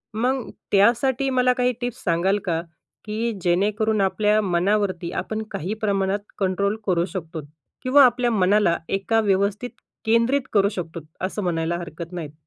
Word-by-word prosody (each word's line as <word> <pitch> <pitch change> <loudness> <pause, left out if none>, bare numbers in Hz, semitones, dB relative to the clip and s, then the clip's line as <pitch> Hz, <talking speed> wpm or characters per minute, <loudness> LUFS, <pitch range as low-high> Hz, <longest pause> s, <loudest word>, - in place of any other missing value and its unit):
मग 250 +2 -1 0.2
त्यासाठी 240 +6 +3
मला 250 -1 +3
काही 250 0 +1
टिप्स 245 0 -4
सांगाल 185 +4 +2
का? 165 -2 0 0.4
की 225 +2 -2
जेणेकरून 205 +4 +1
आपल्या 210 +2 +2
मनावरती 185 -1 0
आपण 220 0 -4
काही 185 +7 -3
प्रमाणात 200 -1 0 0.2
कंट्रोल 200 +2 0
करू 175 -2 +2
शकतो 165 -3 -6 0.4
किंवा 270 +2 +6
आपल्या 245 -1 +2
मनाला 195 -3 +3
एका 200 +3 +1
व्यवस्थित 200 +4 0 0.4
केंद्रित 230 +5 +3
करू 200 -1 +4
शकतो 170 -4 -6 0.3
असं 200 +1 -4
म्हणायला 170 -1 -1
हरकत 170 0 -8
नाही. 155 -4 -6
200 Hz, 140 wpm, -23 LUFS, 180-225 Hz, 0.4 s, किंवा